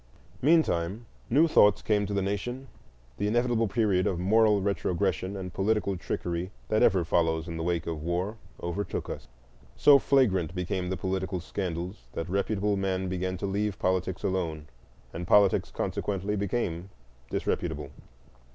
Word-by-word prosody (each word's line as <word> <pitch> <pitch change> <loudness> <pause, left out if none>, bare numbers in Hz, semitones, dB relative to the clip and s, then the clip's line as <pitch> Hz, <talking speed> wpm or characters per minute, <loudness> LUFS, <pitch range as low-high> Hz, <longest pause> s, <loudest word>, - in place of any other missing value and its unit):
Meantime, 115 - +2 0.2
new 150 +7 +5
thoughts 105 -10 +5
came 105 -2 +1
to 105 - -3
the 100 - +1
nation: 120 +7 -3 0.5
the 100 - 0
inevitable 120 0 +2
period 100 -3 +1
of 90 - 0
moral 105 +3 +4
retrogression 95 -1 -1
and 90 -2 -6
political 100 0 +1
trickery 85 0 -3 0.2
that 110 - +2
ever 95 -4 +4
follows 80 -1 +1
in 85 - -5
the 80 - -4
wake 85 -1 -1
of 80 -2 -4
war 90 +7 -2 0.2
overtook 85 +4 -3
us. - - -7 0.5
So 140 -1 +7
flagrant 95 - +2
became 90 0 -2
the 95 - -2
political 95 +1 -2
scandals 90 +1 -5
that 80 - -4
reputable 100 +1 0
men 95 -1 -1
began 95 0 -2
to 100 - -4
leave 100 +1 -1
politics 95 -1 -1
alone, 85 -6 -2 0.5
and 85 +1 -5
politics 100 0 +4
consequently 100 +1 -2
became 95 -3 -2 0.4
disreputable. 75 -1 -2
95 Hz, 145 wpm, -28 LUFS, 90-105 Hz, 0.5 s, So